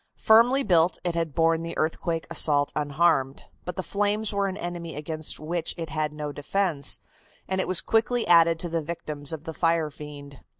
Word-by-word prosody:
Firmly 240 +5 +5
built, 175 -4 +3
it 175 - -1
had 165 -3 -2
borne 165 0 +3
the 165 0 -6
earthquake 165 +1 -1
assault 145 -3 +2
unharmed, 145 -2 +1 0.2
but 180 - -5
the 185 - -3
flames 205 +2 0
were 200 0 +1
an 190 0 -4
enemy 175 -3 -5
against 155 +1 -2
which 165 +1 -2
it 165 -3 -5
had 155 -1 -1
no 150 -1 -5
defense, 150 0 -1 0.5
and 190 0 0
it - - -3
was 185 -1 0
quickly 230 +2 +1
added 165 -1 +5
to 175 - -3
the 165 0 -1
victims 150 -2 -5
of 160 -2 -6
the 165 -1 -6
fire 165 -2 +1
fiend. 145 -2 -10
165 Hz, 185 wpm, -26 LUFS, 150-180 Hz, 0.5 s, Firmly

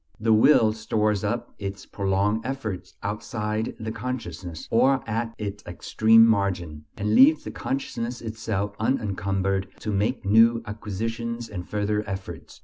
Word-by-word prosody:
The 110 +1 +3
will 110 -1 +5
stores 105 -2 0
up 120 +3 -2
its 100 -1 -5
prolonged 100 +2 0
efforts 115 -8 -5
outside 105 +1 -3
the 110 0 -4
consciousness, 95 -9 -6
or 130 +4 +3
at 115 +1 -2
its 105 -1 -5
extreme 110 +5 +4
margin, 90 -8 0
and 105 0 0
leaves 150 +6 +6
the - - -6
consciousness 120 -3 -3
itself 110 -3 -3
unencumbered 95 -4 0
to 105 - -2
make 105 +5 0
new 115 +3 +5
acquisitions 115 +3 -4
and 90 -4 -7
further 105 0 0
efforts. 95 -5 -7
105 Hz, 135 wpm, -25 LUFS, 100-115 Hz, -, leaves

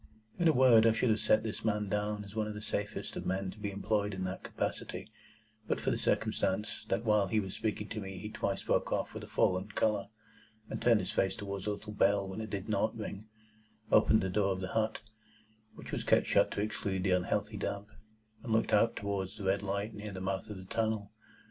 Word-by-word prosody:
In 170 - +4
a - - +7
word, 125 -4 +6
I 115 - +5
should 115 +1 +2
have 110 - +2
set 110 0 +3
this 110 -1 -4
man 105 -2 +1
down 105 +1 -1
as 100 - -11
one 110 -1 0
of 105 - -5
the - - -5
safest 105 -1 -3
of - - -4
men 95 0 -1
to 105 - -14
be 105 -1 -2
employed 100 0 0
in 95 - -3
that 95 +1 -3
capacity, - - -4 0.6
but - - 0
for - - 0
the - - +1
circumstance 105 +3 0
that 115 - 0
while 105 -2 +4
he 110 +3 +2
was 95 -2 -4
speaking 105 -1 -2
to - - -4
me 95 -2 -6
he 105 +2 -6
twice 100 -2 -2
broke - - +1
off - - -1
with - - -6
a - - -8
fallen 95 +2 +2
colour, 105 -1 +1 0.7
turned 115 -4 +4
his 90 - -3
face 95 -1 +1
towards 100 -3 -5
the 105 - +1
little 105 +1 -8
bell 100 -1 +3
when 95 +3 -5
it 110 - -5
did 100 -1 -4
NOT 110 +1 0
ring, 105 -1 -6 0.6
opened 110 - +6
the 95 - 0
door 100 0 +2
of 95 - -5
the 95 - -3
hut 110 +1 0 0.7
(which - - -9
was - - -2
kept - - +4
shut - - +4
to - - -2
exclude 100 -3 -2
the 95 - +2
unhealthy 90 -1 +1
damp), 100 0 -3 0.5
and 120 - -5
looked 110 - +2
out 115 +2 +4
towards 100 0 -3
the 105 - -6
red 95 +1 +2
light 100 +2 -2
near 105 0 -6
the 95 - -6
mouth 95 +3 -2
of 105 - -6
the 95 - -9
tunnel. 110 0 -1
105 Hz, 230 wpm, -32 LUFS, 95-110 Hz, 0.7 s, a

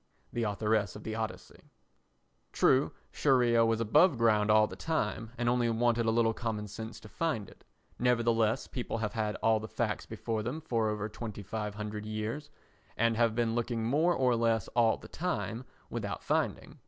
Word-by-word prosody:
[The 120 - -1
Authoress 105 -2 0
of - - -9
the 110 - -4
Odyssey.] 110 -1 -6 0.8
True, 135 +2 +3 0.2
Scheria 120 -4 +3
was 115 -1 +2
above 145 - +4
ground 110 -2 +3
all 110 0 +6
the - - -8
time 115 -8 -2
and 120 0 -1
only 120 -1 +2
wanted 115 0 +2
a - - +4
little 115 0 +3
common 110 -3 -3
sense 110 +2 -7
to - - -11
find 130 -5 -2
it; - - -17 0.4
nevertheless 115 -1 +2
people 120 -2 -4
have 110 0 -2
had 110 -2 -1
all 110 -1 +4
the 110 - -6
facts - - -2
before 110 -1 -3
them 120 +8 -3
for 115 -8 0
over 105 0 -2
2500 105 -1 -5
years 110 +7 -4 0.5
and 115 0 +2
have 115 -1 +2
been 115 -1 +1
looking 115 -1 -1
more 155 +8 +3
or 125 -2 +3
less 115 -3 +1
all 115 -2 +3
the - - -12
time 115 - -3 0.3
without - - -4
finding. - - -1
115 Hz, 170 wpm, -31 LUFS, 110-120 Hz, 0.8 s, all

